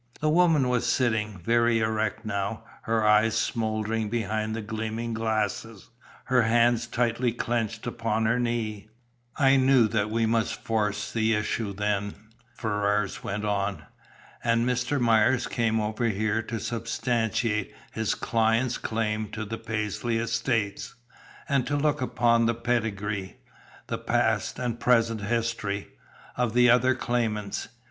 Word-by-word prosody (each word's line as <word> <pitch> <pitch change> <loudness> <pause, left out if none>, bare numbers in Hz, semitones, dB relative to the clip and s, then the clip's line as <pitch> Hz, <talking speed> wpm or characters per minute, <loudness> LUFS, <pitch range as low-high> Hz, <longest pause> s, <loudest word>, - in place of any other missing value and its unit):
The 155 - +1
woman 160 -4 +4
was 125 -1 +1
sitting 110 -5 0
very 115 +5 +2
erect 110 0 -1
now, 100 +1 -3 0.2
her 110 -1 +1
eyes 105 +1 +4
smouldering 110 -1 -1
behind 110 -1 -2
the 115 - -3
gleaming 110 +1 -4
glasses, 110 -1 -2 0.3
her 130 -1 +3
hands 115 +1 +3
tightly 120 0 0
clinched 115 -2 -2
upon 115 -2 -1
her 115 +3 +2
knee. 110 -3 -2 0.5
"I 135 -1 +5
knew 130 -3 +5
that 105 -1 0
we 115 +1 +1
must 115 0 +1
force 105 -2 -1
the 110 -1 +2
issue, 105 0 -2
then," 100 0 -1 0.4
Ferrars 105 -2 -1
went 105 +2 -3
on. 100 -1 -1 0.6
"And 115 0 +2
Mr. 125 +3 0
Myers 120 +1 +3
came 115 -1 0
over 110 +2 -1
here 110 0 0
to 115 0 -5
substantiate 115 -2 -1 0.2
his 110 -1 -1
client's 115 +2 +1
claim 110 -1 -2
to 110 -1 -4
the 115 +2 -5
Paisley 115 +1 -2
estates, 115 -2 -1 0.5
and 140 -3 +1
to 145 - 0
look 145 -1 +1
up 130 - -4 0.3
the 115 - +1
pedigree, 110 -5 -2 0.5
the - - -4
past - - 0
and 120 -2 -3
present 115 -3 +2
history, 110 -2 -2 0.5
of 120 -2 -1
the 125 -1 +6
other 125 +1 +4
claimants. 115 -5 -2
115 Hz, 135 wpm, -26 LUFS, 105-120 Hz, 0.6 s, the